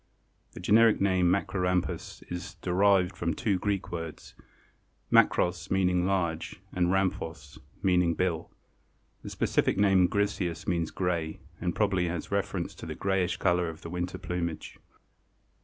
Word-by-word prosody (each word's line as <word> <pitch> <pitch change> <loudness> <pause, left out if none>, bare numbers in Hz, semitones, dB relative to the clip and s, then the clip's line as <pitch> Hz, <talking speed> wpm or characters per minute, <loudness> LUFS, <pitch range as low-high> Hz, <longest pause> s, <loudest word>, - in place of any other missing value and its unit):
The - - -9
generic 110 +4 +5
name 95 -3 +3
Macrorhamphus 90 -1 -1
is 90 0 -5
derived 95 0 +2
from 85 -2 -2
two 100 -4 0
Greek 100 0 -2
words, 80 -2 -6 0.8
makros, 90 0 +3
meaning 90 -1 +2
large, 85 -4 -1
and 90 -1 +2
rhamphos, 95 -3 -2 0.2
meaning 90 -3 +3
bill. 85 -2 -1 0.7
The - - -7
specific - - +1
name 95 -2 +5
griseus 95 -4 -1
means 85 -2 0
gray, 85 -4 -2 0.2
and 85 -1 -2
probably 95 -4 +1
has 85 -1 -4
reference - - -2
to - - -8
the - - -5
grayish 95 -2 0
color 90 -1 +1
of 80 - -9
the 85 - -7
winter 90 0 -3
plumage. 85 -2 -4
90 Hz, 135 wpm, -29 LUFS, 85-95 Hz, 0.8 s, generic